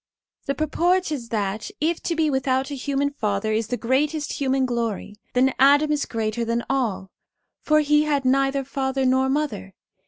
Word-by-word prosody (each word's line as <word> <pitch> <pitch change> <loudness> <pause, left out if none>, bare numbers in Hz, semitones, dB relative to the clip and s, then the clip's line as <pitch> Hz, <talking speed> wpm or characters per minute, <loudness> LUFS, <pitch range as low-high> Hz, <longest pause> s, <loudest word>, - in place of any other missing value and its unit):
The 275 - 0
purport 345 +3 +1
is 245 -6 -4
that, 210 -1 -2
if 325 +2 0
to 335 - 0
be 315 -2 +1
without 265 +1 0
a - - -3
human 280 +1 -1
father 215 -5 -1
is 220 0 0
the 245 - -2
greatest 295 +6 0
human 265 -1 +2
glory, 235 -4 -3 0.2
then 260 +1 +3
Adam 290 +3 +5
is 295 -1 0
greater 225 0 -2
than 230 +1 -1
all, 205 -8 -1 0.5
for 305 0 +3
he 300 +1 +3
had 285 -3 0
neither 270 +1 +2
father 265 0 -2
nor 260 +1 +2
mother. 275 - -2
265 Hz, 175 wpm, -23 LUFS, 235-295 Hz, 0.5 s, Adam